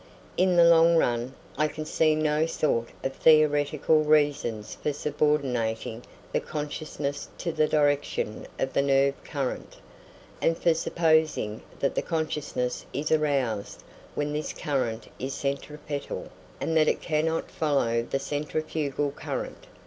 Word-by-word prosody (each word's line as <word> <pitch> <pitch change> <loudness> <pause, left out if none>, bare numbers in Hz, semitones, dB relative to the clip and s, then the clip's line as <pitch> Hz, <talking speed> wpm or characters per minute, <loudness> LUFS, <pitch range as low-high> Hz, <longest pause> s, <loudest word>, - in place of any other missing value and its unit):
In 185 0 +3
the 170 - +7
long 170 0 +6
run, 120 -2 0 0.2
I 155 - +4
can 155 0 -6
see 155 0 +2
no 155 +1 +1
sort 115 -8 0
of 135 - -1
theoretical 155 +1 +4
reason 145 -8 +2
for 150 +7 -4
subordinating 130 -7 -1 0.3
the - - +3
consciousness 150 -1 -4
to 170 - -2
the 155 -1 +2
direction 145 -7 0
of 130 - -2
the - - +3
nerve 140 0 +3
current, 140 -4 -4 0.6
and 165 - +2
for 170 - +3
supposing 160 -9 +1 0.2
that 140 - +1
the - - 0
consciousness 150 -6 -2
is 145 +4 -2
aroused 135 -9 0 0.3
when 150 0 -1
this 150 +1 -3
current 130 -6 -2
is 135 +1 -3
centripetal, 145 +1 -4 0.3
and 165 - -1
that 155 -1 +5
it - - +2
cannot 160 0 -1
follow 135 -7 +1
the 120 - -2
centrifugal 145 0 -2
current. - - -6
150 Hz, 135 wpm, -27 LUFS, 135-155 Hz, 0.6 s, the